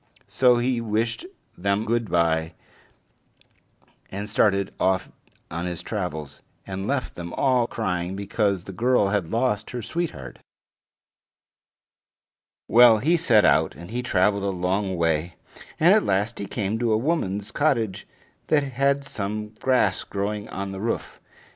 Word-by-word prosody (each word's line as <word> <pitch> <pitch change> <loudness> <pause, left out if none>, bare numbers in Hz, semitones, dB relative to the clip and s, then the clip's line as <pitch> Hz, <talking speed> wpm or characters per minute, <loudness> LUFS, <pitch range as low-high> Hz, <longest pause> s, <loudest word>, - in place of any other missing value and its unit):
So 125 -2 +4
he 120 0 0
wished 115 - -2 0.3
them 100 +3 0
good 115 -1 0
by, 80 -1 +1 1.6
and 100 +2 -5
started 100 -2 +1
off 95 0 +1 0.4
on 85 +2 -3
his 90 -1 -5
travels, 80 -8 -5 0.2
and 95 +1 -5
left 135 -1 -1
them 85 -1 -7
all 125 -3 +2
crying 90 -5 -2
because 100 -2 -1
the 95 - -8
girl 115 +1 +2
had 100 -5 -1
lost 115 -3 0
her 120 -2 -5
sweetheart. 155 - -4 2.3
Well, 120 -1 +7
he 155 +11 +2
set 120 -11 +4
out, - - +3
and 85 +6 -11
he 125 +2 -2
traveled 100 -3 +2
a 100 - 0
long 95 +1 -1
way, 85 0 0 0.4
and 170 +5 +6
at 215 - +5
last 100 +4 0
he 100 - -4
came 105 0 -2
to 120 -2 +1
a - - +3
woman's 105 - -1
cottage 120 -10 0 0.4
that 150 -2 +3
had 140 +1 0
some 105 -2 -4
grass 110 -3 +1
growing 105 +1 -4
on 100 0 -5
the 95 - -6
roof. 115 +2 -3
105 Hz, 140 wpm, -24 LUFS, 95-120 Hz, 2.3 s, Well